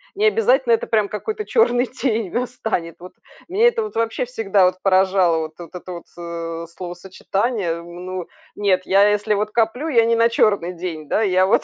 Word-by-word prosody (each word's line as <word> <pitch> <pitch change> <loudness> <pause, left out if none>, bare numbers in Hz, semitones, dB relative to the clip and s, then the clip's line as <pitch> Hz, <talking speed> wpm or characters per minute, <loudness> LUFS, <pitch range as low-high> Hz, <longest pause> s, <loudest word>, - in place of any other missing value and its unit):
не 415 +2 +1
обязательно 265 - +3
это - - +1
прям 215 -3 +1
какой-то 425 - -4
черный 250 - +2
день 230 -7 -2
настанет. 220 -9 -3
Вот 180 +1 -11 0.3
меня 420 +7 +3
это 470 -1 +1
вот 430 - -6
вообще 230 +2 -1
всегда 210 -6 +2
вот 180 - +2
поражало, 185 -3 +3
вот 155 0 -5
вот 175 0 -11
это 180 +1 -8
вот 170 - -9
с, - - -29
э 170 -1 -5
словосочетание. 190 +3 -3
М, 175 +1 -10
ну 185 -1 -5 0.3
нет, 195 -3 +1
я, 200 +2 +5
если 210 +1 +1
вот 210 +1 -1
коплю, 235 +7 0
я 230 -6 +4
не 230 - +2
на 230 0 +4
черный 200 -6 +1
день, 165 -3 -6
да, - - +1
я 185 -1 +3
вот - - +3
205 Hz, 195 wpm, -21 LUFS, 180-235 Hz, 0.3 s, я